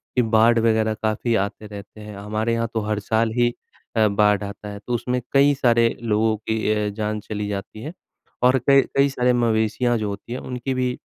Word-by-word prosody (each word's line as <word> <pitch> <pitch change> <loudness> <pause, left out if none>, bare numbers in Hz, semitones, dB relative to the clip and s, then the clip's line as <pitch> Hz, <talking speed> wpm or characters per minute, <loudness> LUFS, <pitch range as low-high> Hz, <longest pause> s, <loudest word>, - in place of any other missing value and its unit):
कि 125 - +4
बाढ़ 115 +1 +5
वग़ैरह 110 -1 +2
काफ़ी 110 +2 0
आते 100 +2 -2
रहते 105 +1 -11
हैं। 105 -1 -9
हमारे 110 +3 -2
यहाँ 115 0 0
तो 115 - 0
हर 105 -1 0
साल 110 +2 0
ही 120 0 +4 0.5
अ, 110 -1 +4
बाढ़ 105 0 +2
आता 100 +1 -7
है। 100 - -7
तो 125 - -2
उसमें 125 +1 -1
कई 140 +1 +5
सारे 120 -3 +3
लोगों 110 -1 +1
की 110 0 -2
अ, 105 -1 -1
जान 105 +1 -3
चली 105 0 -5
जाती 105 +2 -6
है। 150 +7 -7 0.5
और 125 +1 +5
कई 140 -1 +7
कई 140 0 +4
सारे 125 -2 +1
मवेशियाँ 120 +1 +1
जो 105 -1 -2
होती 100 +4 -7
हैं 130 - -4
उनकी 125 +1 -4
भी 125 -1 -1
110 Hz, 205 wpm, -22 LUFS, 105-120 Hz, 0.5 s, कई